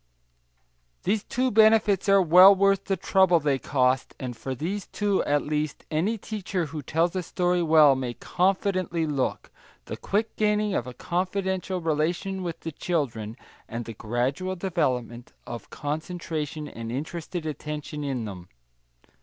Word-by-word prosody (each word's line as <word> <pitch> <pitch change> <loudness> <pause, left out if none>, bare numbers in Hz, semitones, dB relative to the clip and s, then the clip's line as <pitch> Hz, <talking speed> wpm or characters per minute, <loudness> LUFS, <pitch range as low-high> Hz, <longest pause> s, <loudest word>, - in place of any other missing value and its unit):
These 210 +2 0
two 255 +1 0
benefits 215 -2 +4
are 195 -1 +6
well 180 +4 +8
worth 195 0 +2
the 195 - 0
trouble 185 -1 +4
they 145 -3 0
cost, 130 -1 +1
and 125 -2 -5
for 130 +3 -5
these 185 +9 -4
two, 205 -2 0
at 145 0 +1
least, 150 0 -3
any 185 +9 0
teacher 195 -4 -3
who 150 0 -6
tells 165 +6 0
a 185 - 0
story 180 0 0
well 155 -4 +6
may 125 -2 -3
confidently 185 -2 0
look 140 -4 -2 0.3
the - - -5
quick 215 +3 -2
gaining 210 -1 +1
of 125 - -1
a 125 - -8
confidential 185 +1 -2
relation 170 +5 -1
with 175 -2 -5
the 165 - -5
children, 125 -10 -3 0.3
and 115 0 -4
the 115 - -7
gradual 125 - -2
development 130 - -2
of 120 -1 -8
concentration 155 0 -4
and 115 -4 -7
interested 160 +5 -5
attention 150 -1 -5
in 130 -5 -2
them. 90 -4 -8
165 Hz, 145 wpm, -26 LUFS, 140-190 Hz, 0.3 s, well